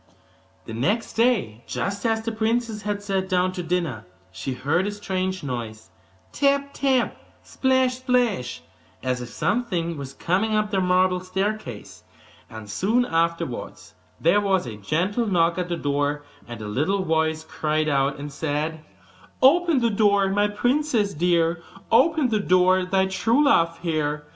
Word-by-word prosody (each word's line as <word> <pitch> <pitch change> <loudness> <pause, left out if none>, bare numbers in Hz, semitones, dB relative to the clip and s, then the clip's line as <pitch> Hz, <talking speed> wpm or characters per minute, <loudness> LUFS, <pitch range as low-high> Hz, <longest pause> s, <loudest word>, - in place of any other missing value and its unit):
The 110 - -7
next 200 - -1
day, 210 - +1
just 200 +3 -2
as 225 0 0
the 230 - -2
princess 225 0 -1
had 205 0 -3
sat 190 -2 -2
down 185 0 +2
to 185 - -5
dinner, 165 - -2 0.2
she 130 +7 -4
heard 160 +9 0
a - - -2
strange 185 -3 -3
noise 110 -6 -6 0.4
tap, 280 0 +1
tap 265 -3 +1 0.5
plash, 260 -1 +2
plash 220 - 0 0.4
as 125 -1 -1
if 120 - -7
something 180 - -1
was 135 -1 -7
coming 200 +5 0
up 210 0 0
the 195 -2 +1
marble 180 0 +2
staircase: 185 - -4 0.5
and 110 -1 -9
soon 215 - +1
afterwards 165 - -2 0.3
there 175 +6 +3
was 190 -4 +1
a 115 -3 -6
gentle 180 - -1
knock 170 -2 +2
at 180 -1 -3
the 170 - -1
door, 145 0 -1 0.2
and 120 -2 -8
a - - -5
little 155 - 0
voice 160 -2 0
cried 155 0 -1
out 140 -1 +1
and 145 0 -7
said: 155 +2 -3 0.6
'Open 320 +1 +4
the 235 -1 +2
door, 200 -2 +3
my 205 +1 +2
princess 240 0 0
dear, 170 +1 +1 0.3
Open 290 +3 +4
the 215 -2 +1
door 185 -1 +4
to 185 - -2
thy 190 0 +2
true 225 +8 +2
love 165 -11 +3
here! 150 -3 -1
185 Hz, 155 wpm, -24 LUFS, 150-215 Hz, 0.6 s, Open